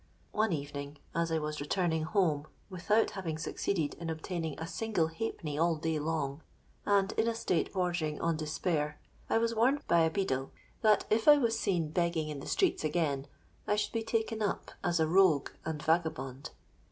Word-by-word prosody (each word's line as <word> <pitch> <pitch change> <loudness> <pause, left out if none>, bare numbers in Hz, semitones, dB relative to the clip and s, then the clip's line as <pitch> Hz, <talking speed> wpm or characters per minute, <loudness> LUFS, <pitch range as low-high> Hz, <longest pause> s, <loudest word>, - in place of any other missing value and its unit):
One 215 -1 +1
evening, 145 -1 -4 0.2
as 170 0 0
I 160 - +2
was 150 -1 -3
returning 160 +1 0
home 160 -5 +1 0.2
without 210 +5 +2
having 170 -6 -4
succeeded 155 -1 -1
in 170 -1 -4
obtaining 160 -1 -4
a 160 - -3
single 180 -3 0
halfpenny 160 -4 -4
all 165 0 +3
day 160 0 -1
long, 150 -2 -2 0.5
and 200 0 +3
in 225 - +1
a 230 - +1
state 180 -6 0
bordering 175 -5 -1
on 165 -1 +1
despair, 155 -1 -1 0.3
I - - +3
was 230 0 +1
warned 255 +6 +2
by 170 - +4
a 160 0 +4
beadle 135 -8 -1 0.3
that 215 -1 +4
if 220 +4 +2
I 295 -1 +10
was 230 -5 +1
seen 170 -5 0
begging 170 -2 0
in 150 -2 -5
the - - -8
streets 375 - +1
again, 150 -3 0 0.4
I 210 - +3
should 210 0 -1
be 230 - 0
taken 225 0 -1
up 205 - -2
as 175 -3 +1
a 160 - +4
rogue 170 -3 +4 0.2
and 160 -1 -3
vagabond. 160 -5 -1
165 Hz, 180 wpm, -31 LUFS, 155-200 Hz, 0.5 s, I